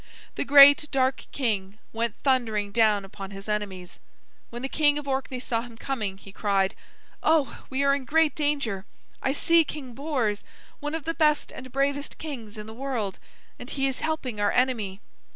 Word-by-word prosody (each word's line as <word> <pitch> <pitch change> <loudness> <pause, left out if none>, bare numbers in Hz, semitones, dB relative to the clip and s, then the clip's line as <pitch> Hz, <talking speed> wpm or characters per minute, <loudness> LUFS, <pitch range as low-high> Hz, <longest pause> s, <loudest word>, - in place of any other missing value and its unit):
The - - -2
great 285 +1 +8
dark 260 -1 +1
king 210 -6 -1 0.2
went 230 -1 -1
thundering 225 -7 +1
down 215 -3 +3
upon 195 0 -8
his 195 +1 -10
enemies. 200 -4 -4 0.5
When 240 +1 -7
the - - 0
King 290 +1 +3
of 295 -1 -5
Orkney 265 -1 -2
saw 235 -2 -1
him 235 -1 -11
coming, 220 -7 -3
he 195 0 -13
cried: 195 -1 +1 0.5
"Oh, 310 -3 +2
we 270 +1 0
are 280 0 +4
in 280 -2 -2
great 320 +3 +3
danger! 280 - -1 0.3
I 265 - +1
see 335 +3 +4
King 275 -5 -7
Bors, 250 -7 -1 0.4
one 295 +1 -3
of 325 - -4
the 330 - -2
best 300 -2 +2
and 255 -1 -10
bravest 280 +2 -1
kings 235 -9 -7
in 210 - -7
the 220 - -9
world, 235 -6 -3 0.4
and 245 - -9
he 270 -1 -1
is 270 -1 -1
helping 265 -9 -2
our 205 - +3
enemy." 225 -6 0
255 Hz, 180 wpm, -26 LUFS, 210-285 Hz, 0.5 s, great